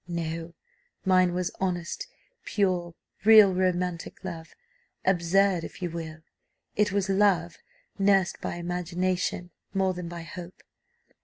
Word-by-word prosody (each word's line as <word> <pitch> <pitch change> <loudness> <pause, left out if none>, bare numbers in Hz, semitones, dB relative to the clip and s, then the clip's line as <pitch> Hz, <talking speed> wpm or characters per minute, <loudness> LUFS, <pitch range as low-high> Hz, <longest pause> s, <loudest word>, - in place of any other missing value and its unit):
No; 165 -1 -4 0.5
mine 185 -1 +4
was 180 -1 -1
honest, 180 - -2 0.4
pure, 180 -4 0 0.3
real 215 -3 +8
romantic 180 -1 -1
love 165 -4 -7 0.5
absurd 185 0 +3
if - - -8
you 175 -2 -3
will; 160 -1 -7 0.5
it 210 -1 +2
was 200 0 0
love 190 -3 +2 0.4
nursed 195 -2 +3
by - - -3
imagination 180 +1 -2 0.2
more 190 -1 +2
than 180 -1 -6
by 170 -1 -7
hope. 175 +2 -10
180 Hz, 115 wpm, -27 LUFS, 170-190 Hz, 0.5 s, real